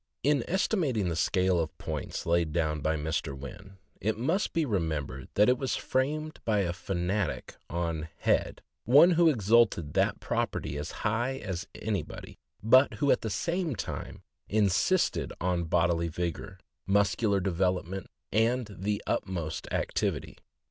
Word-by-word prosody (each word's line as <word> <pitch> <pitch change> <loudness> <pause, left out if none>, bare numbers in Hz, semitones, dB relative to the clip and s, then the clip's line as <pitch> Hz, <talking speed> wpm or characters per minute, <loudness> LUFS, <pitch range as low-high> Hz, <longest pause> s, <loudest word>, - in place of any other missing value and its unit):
In 140 -3 +3
estimating 160 - +1
the 85 - -2
scale 90 +1 +2
of 80 -1 -3
points - - -5
laid 85 -1 +2
down 80 -1 0
by 80 +2 +1
Mr. 75 -3 -2
Wynn, 70 +8 -10 0.2
it 110 +1 0
must 165 - 0
be 165 -2 +1
remembered 80 - -2
that 105 +1 +5
it 125 0 +3
was 135 - -1
framed 155 +4 -1
by 105 -3 +2
a 85 -3 -1
fanatic 90 +1 -2
on 85 -2 -2
"head," - - 0 0.2
one 145 +9 +7
who 170 -1 +5
exalted 110 - +3
that - - +1
property 70 - -2
as 75 +3 -4 0.2
high 120 +5 0
as 95 -6 -5
anybody, 100 -7 -5 0.2
but 130 +5 +5
who 145 -1 +2
at - - +3
the 110 - -3
same 170 - -1
time - - -6 0.3
insisted 105 - +2
on 90 -1 0
bodily 85 0 +2
vigor, 85 +3 -4 0.3
muscu 100 +2 +2
lar 100 -1 +3
development, 95 0 -1 0.2
and 115 0 +1
the 100 +2 -1
utmost 85 -5 -3
activity. - - -1
100 Hz, 145 wpm, -29 LUFS, 85-125 Hz, 0.3 s, one